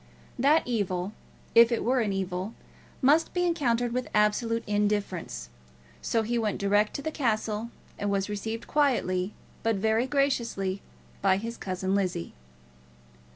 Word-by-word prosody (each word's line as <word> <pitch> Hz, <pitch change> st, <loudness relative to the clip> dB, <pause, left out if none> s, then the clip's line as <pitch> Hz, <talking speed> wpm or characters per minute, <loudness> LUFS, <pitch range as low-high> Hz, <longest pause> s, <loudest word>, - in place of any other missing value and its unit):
That 290 Hz, +5 st, +5 dB
evil, 195 Hz, -5 st, -1 dB, 0.4 s
if 230 Hz, +1 st, +7 dB
it 235 Hz, -, 0 dB
were 255 Hz, +2 st, +2 dB
an 215 Hz, -4 st, +1 dB
evil, 190 Hz, +2 st, -3 dB, 0.5 s
must 305 Hz, +7 st, +4 dB
be 355 Hz, -, +2 dB
encountered 245 Hz, -8 st, +1 dB
with 250 Hz, +1 st, -2 dB
absolute 225 Hz, +2 st, +2 dB
indifference. 205 Hz, -, -1 dB, 0.5 s
So 225 Hz, -1 st, +1 dB
he 235 Hz, +2 st, 0 dB
went 215 Hz, -3 st, 0 dB
direct 205 Hz, +1 st, +2 dB
to 280 Hz, -, -4 dB
the 315 Hz, -, -2 dB
castle, 220 Hz, -4 st, -1 dB, 0.3 s
and 205 Hz, -, -1 dB
was 195 Hz, -1 st, 0 dB
received 220 Hz, +2 st, -4 dB
quietly, 210 Hz, -10 st, +1 dB, 0.3 s
but 225 Hz, -1 st, +1 dB
very 220 Hz, +5 st, +1 dB
graciously, 235 Hz, -9 st, 0 dB, 0.4 s
by 190 Hz, -1 st, +4 dB
his 230 Hz, +3 st, -4 dB
cousin 185 Hz, -1 st, -2 dB
Lizzie. 185 Hz, -, -1 dB
215 Hz, 140 wpm, -28 LUFS, 195-240 Hz, 0.5 s, if